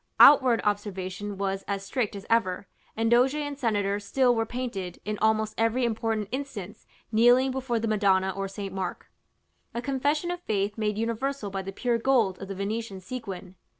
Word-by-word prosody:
Outward 260 Hz, -5 st, +8 dB
observance 200 Hz, -2 st, -2 dB
was 195 Hz, -1 st, -3 dB
as 200 Hz, 0 st, -3 dB
strict 220 Hz, -1 st, -1 dB
as 200 Hz, -, -8 dB
ever; 200 Hz, -5 st, +1 dB, 0.3 s
and 225 Hz, +1 st, +1 dB
doge 250 Hz, +4 st, +5 dB
and 290 Hz, -1 st, -3 dB
senator 205 Hz, -5 st, +1 dB
still 245 Hz, +5 st, +2 dB
were 225 Hz, -1 st, 0 dB
painted, 215 Hz, -8 st, -4 dB
in 210 Hz, 0 st, -3 dB
almost 220 Hz, 0 st, +2 dB
every 230 Hz, +2 st, +2 dB
important 225 Hz, -2 st, -1 dB
instance, 255 Hz, -8 st, -6 dB, 0.2 s
kneeling 245 Hz, +4 st, +5 dB
before 255 Hz, -2 st, -1 dB
the 225 Hz, -, -1 dB
Madonna 195 Hz, -3 st, +2 dB
or 195 Hz, 0 st, -2 dB
St. 195 Hz, 0 st, -6 dB
Mark; 190 Hz, -2 st, -5 dB, 0.6 s
a -, -, 0 dB
confession 290 Hz, +5 st, 0 dB
of 355 Hz, 0 st, -5 dB
faith 205 Hz, -, -1 dB
made 210 Hz, -2 st, -1 dB
universal 230 Hz, 0 st, -2 dB
by 195 Hz, 0 st, -2 dB
the 195 Hz, +1 st, -6 dB
pure 235 Hz, +3 st, 0 dB
gold 230 Hz, -7 st, +2 dB
of 195 Hz, -, -6 dB
the 195 Hz, -, -5 dB
Venetian 200 Hz, +1 st, -3 dB
sequin. 190 Hz, -3 st, -7 dB
220 Hz, 175 wpm, -27 LUFS, 195-245 Hz, 0.6 s, Outward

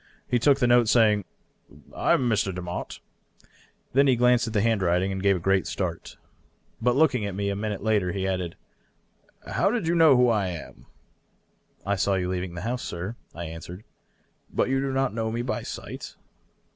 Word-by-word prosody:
He 125 Hz, -, +1 dB
took 140 Hz, +2 st, +4 dB
the 135 Hz, -, +1 dB
note, 120 Hz, -1 st, +4 dB
saying, 105 Hz, -3 st, +4 dB, 0.4 s
" -, -, -44 dB, 0.3 s
I -, -, +2 dB
am 125 Hz, -, +2 dB
Mr. 105 Hz, -4 st, +1 dB
Demotte." 90 Hz, -1 st, -5 dB, 1.0 s
Then 140 Hz, +2 st, +4 dB
he 130 Hz, -, +4 dB
glanced 125 Hz, 0 st, +3 dB
at 110 Hz, -, -5 dB
the 105 Hz, -, +2 dB
handwriting, 95 Hz, -4 st, +1 dB
and 95 Hz, 0 st, -3 dB
gave 100 Hz, 0 st, +3 dB
a -, -, -2 dB
great 95 Hz, +1 st, +1 dB
start. -, -, -4 dB, 0.6 s
But 120 Hz, +1 st, +2 dB
looking 135 Hz, -6 st, +3 dB
at 100 Hz, -, -5 dB
me 100 Hz, 0 st, -1 dB
a 100 Hz, -, -1 dB
minute 105 Hz, -1 st, -4 dB
later, 105 Hz, -5 st, +1 dB
he 95 Hz, 0 st, -2 dB
added, 90 Hz, -3 st, -2 dB, 0.5 s
" -, -, -35 dB
How -, -, +3 dB
did 220 Hz, -6 st, -1 dB
you 170 Hz, -, +2 dB
know 160 Hz, -6 st, +6 dB
who 125 Hz, 0 st, +5 dB
I 105 Hz, -4 st, +1 dB
am 85 Hz, -3 st, -8 dB, 0.3 s
?" -, -, -43 dB
" -, -, -38 dB
I 100 Hz, 0 st, 0 dB
saw 100 Hz, 0 st, +1 dB
you 90 Hz, -1 st, -1 dB
leave 90 Hz, -1 st, -3 dB
the 85 Hz, -, -5 dB
house, 125 Hz, +5 st, -3 dB
sir," 90 Hz, +7 st, -5 dB, 0.2 s
I 85 Hz, -, -5 dB
answered. 85 Hz, +4 st, -9 dB, 0.4 s
" -, -, -42 dB
But -, -, 0 dB
you 135 Hz, 0 st, +1 dB
do 135 Hz, 0 st, -1 dB
not 135 Hz, -3 st, 0 dB
know 110 Hz, 0 st, -2 dB
me 120 Hz, +1 st, -2 dB
by 125 Hz, -, -2 dB
sight -, -, -8 dB
105 Hz, 210 wpm, -26 LUFS, 95-125 Hz, 1.0 s, know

